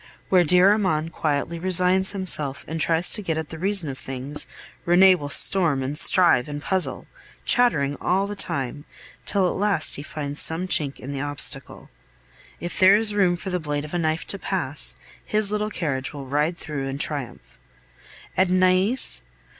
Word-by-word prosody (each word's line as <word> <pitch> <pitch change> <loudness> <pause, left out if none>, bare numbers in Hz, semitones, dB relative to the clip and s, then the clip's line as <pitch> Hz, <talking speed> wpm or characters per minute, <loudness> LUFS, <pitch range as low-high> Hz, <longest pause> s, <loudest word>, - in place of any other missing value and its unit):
Where 185 -2 +4
dear 180 +4 +4
Armand 165 -6 -1
quietly 155 +2 -2
resigns 185 +1 +1
himself 160 -8 -4
and 160 0 -5
tries 165 +2 +1
to 215 - +1
get 165 -5 -3
at 160 -1 -5
the 160 - -9
reason 195 -2 0
of 135 -1 -7
things, 135 +3 -3 0.4
Rene 185 +2 +5
will 145 -5 -5
storm, 155 -4 +4
and 135 +3 -4
strive, 165 -5 +5
and 145 0 -5
puzzle, 185 +4 -3 0.4
chattering 145 - +2
all 190 +2 0
the 205 +1 -6
time, 145 -5 -3 0.4
till 195 -3 +1
at - - -2
last 200 -5 +1
he - - -6
finds 145 -1 -4
some 165 +3 +1
chink 145 -6 +1
in 135 - -8
the 140 -1 -5
obstacle; 145 -1 -1 0.7
if 175 - -6
there 190 +1 +6
is 210 0 +3
room 190 -4 +2
for 190 +2 -7
the 180 - -1
blade 150 -2 -4
of 150 - -11
a 175 - -1
knife 160 0 -2
to 200 - -1
pass, 155 -9 -2 0.3
his 210 -1 0
little 210 0 -2
carriage 145 -8 -4
will 140 -1 -8
ride 150 +5 -1
through 145 -5 -5
in 135 0 -5
triumph. 145 -3 -7 0.8
And 185 0 +2
Nais? 185 +7 +2
170 Hz, 180 wpm, -23 LUFS, 145-190 Hz, 0.8 s, there